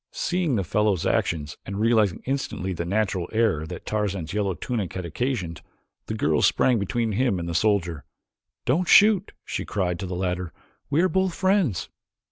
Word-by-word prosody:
Seeing 175 -6 -1
the 100 - 0
fellow's 105 0 +1
actions 75 -1 0
and 100 +1 -5
realizing 110 -4 +2
instantly 125 -8 -2
the 85 -1 -4
natural 95 -2 -1
error 105 -9 +1
that 90 +1 -8
Tarzan's 100 -6 -2
yellow 100 -3 0
tunic 110 -6 -3
had 95 -1 -4
occasioned 90 - -3 0.5
the - - -3
girl - - +1
sprang 125 -3 +3
between 115 +3 -1
him 115 -1 +1
and 85 -1 -4
the 85 - -3
soldier. 85 -4 +1 0.6
"Don't 165 +8 +1
shoot," 205 0 +6
she - - -3
cried 90 -4 -2
to 95 - -4
the 90 - -4
latter, 90 -1 -2 0.4
"we 145 +3 +3
are - - +5
both 190 -1 0
friends." 185 - +1
100 Hz, 170 wpm, -25 LUFS, 90-125 Hz, 0.6 s, shoot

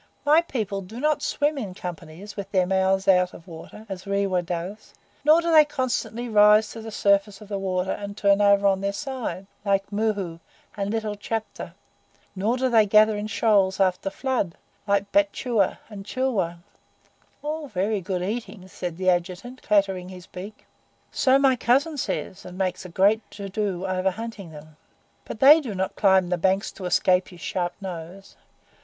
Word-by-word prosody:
MY 305 +3 +6
people 215 - -3
do 210 +6 -9
not 300 +2 +1
swim 290 0 0
in 195 -7 -6
companies, 175 +3 -8
with 200 -1 -6
their 185 -2 +2
mouths 190 +1 +1
out 180 -1 +3
of 165 - -13
the 180 - -14
water, 165 +6 -11
as 190 -1 -7
Rewa 200 -2 +1
does; 180 +5 -6 0.3
nor 310 +3 +6
do 335 - 0
they 310 -1 +8
constantly 255 -4 -3
rise 210 0 +5
to 225 - -8
the 225 - -7
surface 200 -1 +1
of 210 - -13
the 200 -1 -3
water, 185 -1 -1
and 200 0 -6
turn 200 0 +3
over 200 0 +4
on 195 -1 +3
their 200 0 -1
sides, 255 -5 -5 0.2
like 195 -1 0
Mohoo 205 -5 -2 0.4
and 200 -1 -2
little 215 -1 -2
Chapta; 220 +1 -5 0.6
nor 215 +6 0
do 260 0 +1
they 225 -4 +4
gather 215 +1 +5
in 205 +1 -4
shoals 200 -2 +2
after 190 0 +1
flood, 240 -6 -2 0.3
like 200 0 +1
Batchua 255 -8 +1
and 205 -3 -9
Chilwa." 215 -7 -1 0.9
"All 305 +1 -3
are - - -12
very 200 +1 -1
good 180 0 -3
eating," 205 -2 -5
said 175 -2 -6
the 185 0 +3
Adjutant, 180 +9 -3
clattering 195 -3 +1
his 180 -1 -11
beak. 195 +4 -10 0.5
"So 265 0 +3
my 270 -2 +4
cousin 275 +7 +1
says, 195 -8 -4
and 180 0 -10
makes 190 -1 -2
a - - -8
great 200 +5 +3
to 200 -1 -7
do 195 -2 -2
over 185 0 0
hunting 215 -2 -7
them, 155 0 -13 0.5
but 220 - -7
they 295 +4 +8
do 230 -8 -6
not 190 0 -2
climb 190 -3 +3
the 180 -1 -1
banks 190 +4 +1
to 190 - -9
escape 180 +1 +2
his 175 -2 -14
sharp 175 +2 -2
nose. 185 0 -8
200 Hz, 180 wpm, -24 LUFS, 185-225 Hz, 0.9 s, they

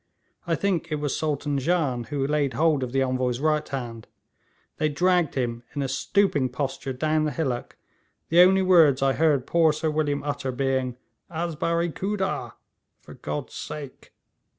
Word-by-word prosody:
I 165 - +2
think 185 -4 -1
it - - +1
was 145 -2 -2
Sultan 145 -2 -1
Jan 135 -6 0
who 135 +3 -2
laid 145 -2 0
hold 155 -3 +2
of 125 -2 -3
the 135 +1 +2
Envoy's 130 -1 -1
right 155 +1 +1
hand. 120 -5 -5 0.7
They 155 - +1
dragged 175 +2 +2
him 120 -3 -2
in 145 - -1
a - - -1
stooping 145 0 +1
posture 135 +1 -3
down 155 +4 0
the 150 - -1
hillock, 130 -5 -3 0.5
the 170 - +4
only 190 +1 +6
words 160 -8 +5
I 135 -1 +3
heard 150 -4 +2
poor 165 -2 +4
Sir 155 +1 -1
William 150 -2 -1
utter 145 -2 -2
being, 130 -1 -1 0.3
"Az 170 0 -3
barae 170 +2 0
Khooda" 195 0 -2 0.5
("For - - -13
God's 75 0 -5
sake"). 145 -3 -8
145 Hz, 165 wpm, -25 LUFS, 130-165 Hz, 0.7 s, only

